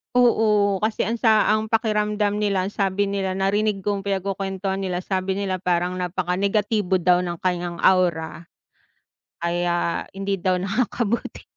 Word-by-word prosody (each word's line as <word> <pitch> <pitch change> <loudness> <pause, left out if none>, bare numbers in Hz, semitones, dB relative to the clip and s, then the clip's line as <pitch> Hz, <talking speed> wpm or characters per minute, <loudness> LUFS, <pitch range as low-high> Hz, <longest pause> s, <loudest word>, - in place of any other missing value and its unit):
Oo, 215 -5 +3
kasi 215 0 0
ang 230 - 0
sa 220 -2 +3
ang 215 0 +1
pakiramdam 210 -2 +1
nila, 200 -3 0
sabi 200 0 0
nila 195 -1 -2
narinig 195 +2 0
kong 200 0 -2
pinagkukuwentuhan 195 0 -2
nila, 180 -2 -2
sabi 190 +1 -2
nila, 195 -2 -1
parang 180 0 -1
napaka-negatibo 190 +2 0
daw 180 0 +3
ng 175 -2 -4
kaniyang 175 -1 -2
aura. 170 -3 +2 1.0
Kaya, 175 0 -1
hindi 195 0 -2
daw 180 0 0
nakakabuti. 230 +2 -2
195 Hz, 130 wpm, -23 LUFS, 180-210 Hz, 1.0 s, Oo